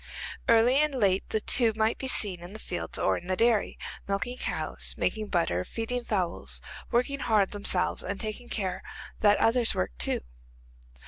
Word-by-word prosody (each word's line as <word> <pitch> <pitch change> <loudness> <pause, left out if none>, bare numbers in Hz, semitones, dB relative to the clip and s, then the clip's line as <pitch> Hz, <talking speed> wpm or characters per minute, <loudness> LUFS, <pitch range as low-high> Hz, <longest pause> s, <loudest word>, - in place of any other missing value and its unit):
Early 230 +3 +5
and 300 -1 +3
late 195 -6 +1
the 220 - +1
two 230 +1 +4
might 220 +1 +1
be 265 - -3
seen 200 -8 +3
in 175 +3 -10
the - - -7
fields - - -3
or - - +2
in 175 - -9
the 185 - 0
dairy, 230 0 +2 0.3
milking 200 +6 -2
cows, - - -2
making 215 -1 -1
butter, 165 - 0
feeding 240 - -3
fowls; 185 -7 -2 0.3
working 250 +4 +1
hard 210 -6 +2
themselves 200 -3 0
and 200 +1 -4
taking 220 +3 -5
care 185 -4 -2 0.4
that 205 -1 +5
others 230 0 +2
worked - - -2
too. 65 - 0
215 Hz, 170 wpm, -28 LUFS, 190-235 Hz, 0.4 s, Early